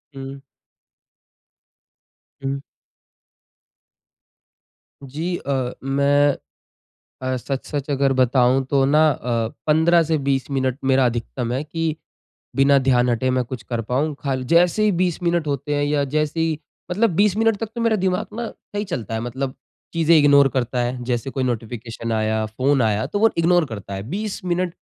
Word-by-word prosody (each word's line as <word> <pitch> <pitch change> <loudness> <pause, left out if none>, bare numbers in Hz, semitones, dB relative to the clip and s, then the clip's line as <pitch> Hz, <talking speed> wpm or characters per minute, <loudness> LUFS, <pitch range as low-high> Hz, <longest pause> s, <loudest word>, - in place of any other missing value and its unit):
हुँ। 135 0 -8 2.0
हुँ। 135 +1 -2 2.4
जी। 155 +7 -3
अ, 130 -3 -2
मैं 140 +1 +3 0.8
अ, 130 0 -1
सच-सच 140 +2 -4
अगर 135 -1 +2
बताऊँ 130 0 +3
तो 135 0 +2
न 140 +2 +2
अ, 125 -7 +2 0.2
15 165 +2 +4
से 160 0 0
20 140 -1 -1
मिनट 130 -2 0
मेरा 130 0 +4
अधिकतम 120 0 -2
है 130 +3 -1
कि 160 0 -2 0.6
बिना 140 +1 +5
ध्यान 125 -2 +2
हटे 120 +2 +1
मैं 130 0 +1
कुछ 120 -1 -7
कर 120 0 -3
पाऊँ 145 +4 0
खाली 135 -2 -2
जैसे 175 +5 +4
ही 210 - +4
20 180 -1 0
मिनट 170 -2 +1
होते 145 +1 -2
हैं 145 - +1
या 145 0 +1
जैसे 155 +1 0
ही 160 -2 0 0.3
मतलब 220 +5 +2
20 200 +1 +3
मिनट 225 -1 +2
तक 225 +1 -4
तो 235 - -2
मेरा 230 -1 +3
दिमाग़ 190 +1 -1
न 235 - -3 0.3
सही 205 - 0
चलता 125 - -4
है 110 - -1
मतलब 130 +3 -4 0.4
चीजें 165 0 +4
इग्नोर 140 -2 +6
करता 125 -1 0
है। 125 +1 -3
जैसे 120 +1 -2
कोई 130 - -2
नोटिफ़िकेशन 115 -1 -4
आया, 110 0 0
फ़ोन 130 +5 +1
आया 110 -2 +1
तो 205 - -2
वो 225 +1 +5
इग्नोर 170 0 +3
करता 100 -6 -7
है। 95 - -5
20 205 +3 -4
मिनट 180 0 -1
140 Hz, 160 wpm, -22 LUFS, 125-165 Hz, 2.4 s, इग्नोर